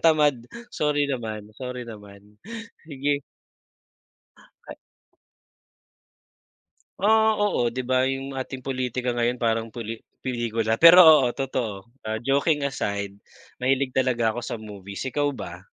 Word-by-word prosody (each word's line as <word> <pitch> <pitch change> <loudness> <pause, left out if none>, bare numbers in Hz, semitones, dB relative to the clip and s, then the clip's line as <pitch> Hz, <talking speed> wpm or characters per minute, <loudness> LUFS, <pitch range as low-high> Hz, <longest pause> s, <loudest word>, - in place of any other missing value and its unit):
tamad, 150 -4 +4 0.4
sorry 150 -1 +1
naman, 110 -5 -5
sorry 125 -1 -6
naman, 105 -2 -13 0.5
sige. 140 -1 -1 1.5
Ah - - -8 2.2
Ah, 220 +2 +4
oo 200 -13 +1
'di 125 +2 -5
ba 130 +1 +2
yung 135 +1 -4
ating 130 -1 -6
politika 125 -1 -2
ngayon 120 +1 0
parang 115 -1 0
puli 115 0 -7 0.2
pelikula 115 -2 -2
pero 170 +2 +10
oo 150 -6 +7
totoo, 120 -7 -3 0.2
ah, 110 0 -3
joking 140 +4 +1
aside, 100 -7 -3 0.5
mahilig 130 0 +1
talaga 120 -4 +1
ako 120 - -4
sa 120 - -4
movies, 100 -2 -8
ikaw 145 +3 0
ba? 90 -10 -7
125 Hz, 120 wpm, -25 LUFS, 110-140 Hz, 2.2 s, pero